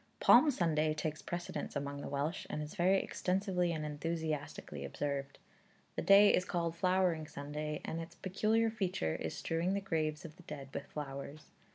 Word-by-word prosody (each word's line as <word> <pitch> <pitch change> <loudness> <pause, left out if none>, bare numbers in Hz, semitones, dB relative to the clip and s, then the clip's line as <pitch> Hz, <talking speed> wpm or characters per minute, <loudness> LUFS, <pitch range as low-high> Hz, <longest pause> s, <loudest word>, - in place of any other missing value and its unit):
Palm 310 - +7
Sunday 155 - +1
takes 155 0 -3
precedence 175 0 -4
among 140 0 -3
the - - -5
Welsh, 145 +6 -2
and 150 - -2
is 150 - -7
very 190 0 +4
extensively 180 -2 0
and 155 -2 -2
enthusiastically 150 - -3
observed. 140 - -3 0.6
The - - -1
day 200 +1 +7
is 180 - +3
called 170 -2 -1
Flowering 180 -3 +2
Sunday, 150 +1 -4
and 165 - -3
its 165 +1 -9
peculiar 215 +5 +1
feature 185 - -1
is 80 - -4
strewing 170 +4 0
the - - +1
graves 155 -5 -1
of 160 +1 -10
the 180 - -15
dead 140 -2 -7
with 140 - -5
flowers. 140 0 -7
160 Hz, 170 wpm, -34 LUFS, 145-180 Hz, 0.6 s, Palm